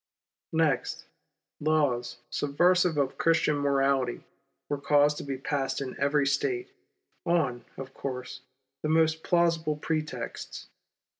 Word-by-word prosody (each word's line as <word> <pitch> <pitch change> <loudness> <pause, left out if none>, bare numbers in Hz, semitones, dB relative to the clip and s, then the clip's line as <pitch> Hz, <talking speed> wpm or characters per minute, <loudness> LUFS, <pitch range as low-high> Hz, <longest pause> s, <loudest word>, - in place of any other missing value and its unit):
Next, 160 -5 +1 0.5
laws 145 -6 +1
subversive 175 +3 +3
of 135 -2 0
Christian 160 -2 +3
morality 135 -3 +1 0.4
were 145 - -2
caused 145 +1 +4
to - - -5
be 140 -2 -4
passed 135 0 -1
in 135 -2 -5
every 140 +1 +2
State, 370 - 0 0.5
on, 155 -9 +1
of 135 0 -7
course, 125 -1 -5 0.4
the 155 - -1
most 160 0 +3
plausible 165 -3 +2
pretexts. 150 -5 -4
145 Hz, 115 wpm, -28 LUFS, 135-160 Hz, 0.5 s, caused